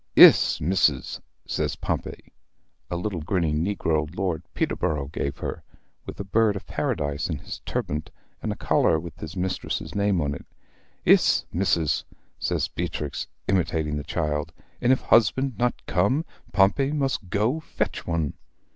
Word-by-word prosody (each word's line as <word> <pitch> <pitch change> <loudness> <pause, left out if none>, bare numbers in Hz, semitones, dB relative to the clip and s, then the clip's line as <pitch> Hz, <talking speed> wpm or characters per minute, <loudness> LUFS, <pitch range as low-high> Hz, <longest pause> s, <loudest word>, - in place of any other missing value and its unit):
"Iss, - - +8
Missis!" 75 -5 +1 0.2
says - - -1
Pompey, - - -4 0.6
a - - -2
little 90 -2 -3
grinning 80 -2 0
negro 80 -6 0
Lord 90 -4 -1
Peterborrow 70 -3 -1
gave 70 -1 -3
her, - - -4 0.5
with - - -7
a - - -2
bird 105 +1 +2
of 100 - -6
Paradise 70 +2 -1
in 80 - -1
his 75 - -7
turbant, 75 +2 -2 0.3
and - - -2
a - - -3
collar 80 - +2
with 85 -1 -9
his 80 +4 -7
mistress's 90 +1 -2
name 100 -2 +2
on 70 -2 0
it. 70 - -9 0.6
"Iss, - - +5
Missis!" 85 -4 +1 0.4
says - - 0
Beatrix, 75 -2 -4 0.2
imitating 80 -5 +1
the 75 - -4
child. 75 0 -2 0.3
"And 120 - +4
if 130 - +3
husband 120 +1 +3
not 120 0 0
come, 130 - +2 0.3
Pompey 110 +8 +3
must 135 -9 -1
go 110 - +1
fetch 160 - -3
one." 80 -4 0
85 Hz, 145 wpm, -25 LUFS, 75-105 Hz, 0.6 s, Iss